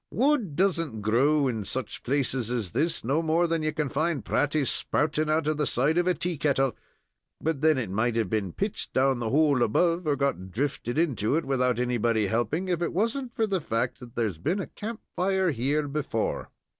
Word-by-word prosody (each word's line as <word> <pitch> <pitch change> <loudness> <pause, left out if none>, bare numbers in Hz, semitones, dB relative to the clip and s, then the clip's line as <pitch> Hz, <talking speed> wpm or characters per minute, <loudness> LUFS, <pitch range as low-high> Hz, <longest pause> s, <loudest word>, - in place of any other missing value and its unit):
"Wood 250 - +1
doesn't 165 - +1
grow 135 +7 +3
in 115 -4 -2
such 130 +6 -2
places 130 -3 0
as 115 -8 -1
this, 160 +8 -1
no 140 +7 +1
more 165 +2 +2
than 165 -1 0
ye 155 0 0
can 150 -1 -1
find 155 -1 -1
praties 145 -1 +1
sprouting 155 +1 0
out 155 0 +2
of 155 0 0
the 150 - 0
side 150 +7 +2
of 175 - +1
a 180 - +3
tea 170 0 -2
kettle; 135 -4 +1 0.6
but 155 -3 -2
then 155 -2 +4
it 110 -7 -3
might 110 +4 0
have 115 -3 +1
been 100 -2 -1
pitched 200 - -3
down 130 -1 +2
the 115 -2 -2
hole 145 -1 +3
above, 170 +9 +2
or 145 - +3
got 135 -10 -1
drifted 125 +3 -2
into 140 -7 +1
it 165 - 0
without 125 -3 +1
anybody 120 -3 +1
helping, 120 - -1
if 175 -2 -1
it 170 - -1
wasn't 235 +7 -1
for 225 - +2
the 195 -4 -1
fact 120 -2 -2
that 120 -1 -12
there's 105 -9 -1
been 175 - 0
a 195 - -2
camp 220 +1 -7
fire 190 -1 +1
here 145 +4 0
before." 140 -6 -2
145 Hz, 205 wpm, -27 LUFS, 120-165 Hz, 0.6 s, then